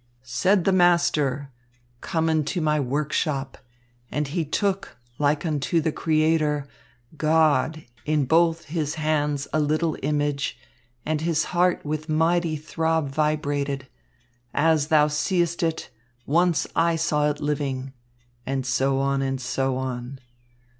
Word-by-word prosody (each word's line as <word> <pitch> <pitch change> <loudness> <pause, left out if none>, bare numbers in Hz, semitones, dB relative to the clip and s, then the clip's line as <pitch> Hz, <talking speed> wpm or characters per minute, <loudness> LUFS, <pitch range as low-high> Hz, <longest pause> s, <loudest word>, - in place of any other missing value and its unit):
"Said 185 +9 +2
the 195 - +3
master: 150 -6 +2 0.5
'Come 165 -1 -1
into 155 +2 0
my 150 -2 +1
workshop.' 140 0 -1 0.5
And 150 -1 -2
he 165 +3 -1
took, 195 +6 -2 0.2
like 150 +2 +1
unto 155 +1 0
the 160 0 0
Creator, 155 -2 +1 0.5
God! 155 0 +2 0.2
in 150 -2 +1
both 165 +3 +2
his 155 -1 -2
hands 150 -2 0
a 155 - +2
little 155 +2 +1
image, 145 0 -1 0.5
And 155 -1 -1
his 165 -1 +1
heart 180 -1 +2
with 155 +1 -3
mighty 165 +1 +2
throb 160 0 -1
vibrated. 145 -2 -1 0.7
'As 155 -1 +3
thou 155 -2 +4
seest 170 +4 0
it, 165 -1 -2 0.3
once 170 +2 +2
I 165 0 +3
saw 150 -2 +1
it 145 0 -3
living.' 135 -3 -2 0.5
And 135 -1 -2
so 135 +1 +1
on, 135 0 +1
and 135 -1 -1
so 130 +1 -1
on. 130 0 -4
150 Hz, 125 wpm, -24 LUFS, 140-160 Hz, 0.7 s, thou